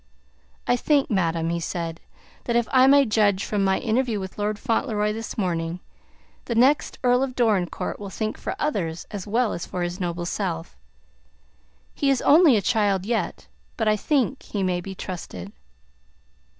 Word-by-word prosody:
"I 245 Hz, -, +2 dB
think, 280 Hz, 0 st, +2 dB
madam," 165 Hz, -4 st, 0 dB
he 170 Hz, -, -1 dB
said, 165 Hz, -1 st, -4 dB, 0.5 s
"that 235 Hz, -, -1 dB
if 235 Hz, -1 st, +2 dB
I 260 Hz, 0 st, +6 dB
may 280 Hz, 0 st, +6 dB
judge 205 Hz, -3 st, +2 dB
from 205 Hz, -2 st, 0 dB
my 190 Hz, 0 st, +2 dB
interview 235 Hz, -1 st, 0 dB
with 190 Hz, +1 st, -7 dB
Lord 210 Hz, 0 st, -1 dB
Fauntleroy 215 Hz, -3 st, 0 dB
this 225 Hz, +1 st, -6 dB
morning, 170 Hz, -3 st, -1 dB, 0.7 s
the 235 Hz, -, -2 dB
next 265 Hz, +6 st, +3 dB
Earl 250 Hz, 0 st, +4 dB
of 265 Hz, -2 st, -2 dB
Dorincourt 210 Hz, -8 st, 0 dB
will 200 Hz, -1 st, -6 dB
think 215 Hz, +2 st, -3 dB
for -, -, -5 dB
others 180 Hz, -, -2 dB
as 205 Hz, -2 st, -6 dB
well 230 Hz, +2 st, +1 dB
as 170 Hz, -, -5 dB
for 180 Hz, -, -3 dB
his 175 Hz, +2 st, -4 dB
noble 175 Hz, -1 st, -3 dB
self. 170 Hz, -, -3 dB, 1.2 s
He 280 Hz, -, 0 dB
is 270 Hz, -2 st, +3 dB
only 300 Hz, -5 st, +6 dB
a 200 Hz, -, -1 dB
child 200 Hz, -4 st, +1 dB
yet, 200 Hz, -, -2 dB, 0.3 s
but 220 Hz, -, 0 dB
I 215 Hz, -, +4 dB
think 270 Hz, +3 st, 0 dB
he 200 Hz, -2 st, -4 dB
may 180 Hz, -1 st, 0 dB
be 190 Hz, +2 st, -7 dB
trusted." 100 Hz, -, -7 dB
210 Hz, 170 wpm, -24 LUFS, 180-240 Hz, 1.2 s, I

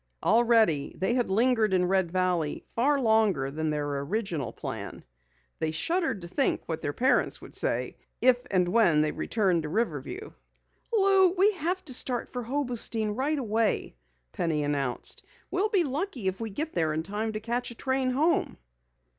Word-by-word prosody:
Already 225 Hz, -10 st, +3 dB
they 190 Hz, +7 st, 0 dB
had 245 Hz, -4 st, 0 dB
lingered 220 Hz, -1 st, +2 dB
in 180 Hz, -1 st, +2 dB
Red 190 Hz, -1 st, +1 dB
Valley 180 Hz, -4 st, -1 dB
far 280 Hz, +5 st, +1 dB
longer 215 Hz, -, +2 dB
than 155 Hz, +2 st, -2 dB
their 145 Hz, -2 st, -2 dB
original 165 Hz, -, -3 dB
plan. -, -, -7 dB, 0.5 s
They 160 Hz, -, 0 dB
shuddered 320 Hz, -, 0 dB
to -, -, -6 dB
think 270 Hz, +10 st, +1 dB
what 160 Hz, -1 st, -4 dB
their 145 Hz, -, -2 dB
parents 255 Hz, -, +1 dB
would -, -, -13 dB
say -, -, -1 dB, 0.2 s
if 250 Hz, -1 st, +4 dB
and 180 Hz, -2 st, +2 dB
when 180 Hz, -7 st, +4 dB
they 155 Hz, 0 st, +1 dB
returned 190 Hz, -7 st, 0 dB
to 155 Hz, -, -5 dB
Riverview. 220 Hz, -, -3 dB, 0.6 s
"Lou, 390 Hz, -3 st, +5 dB
we 390 Hz, +3 st, +4 dB
have 365 Hz, 0 st, -3 dB
to 270 Hz, -, -2 dB
start 245 Hz, -1 st, 0 dB
for 250 Hz, -, -5 dB
Hobostein 240 Hz, -4 st, +1 dB
right 290 Hz, +5 st, 0 dB
away!" 225 Hz, -, 0 dB, 0.4 s
Penny 155 Hz, -3 st, -1 dB
announced. 140 Hz, -4 st, -2 dB, 0.3 s
"We'll 390 Hz, +4 st, +1 dB
be 395 Hz, -5 st, +3 dB
lucky 285 Hz, -, -3 dB
if 190 Hz, +3 st, -2 dB
we 225 Hz, -, -3 dB
get 305 Hz, +10 st, -3 dB
there 160 Hz, -2 st, 0 dB
in 160 Hz, -, -2 dB
time 210 Hz, +4 st, -3 dB
to 215 Hz, -, -3 dB
catch 235 Hz, +3 st, -2 dB
a 235 Hz, -, -8 dB
train 260 Hz, +1 st, 0 dB
home." 300 Hz, +7 st, +1 dB
220 Hz, 170 wpm, -27 LUFS, 170-265 Hz, 0.6 s, Lou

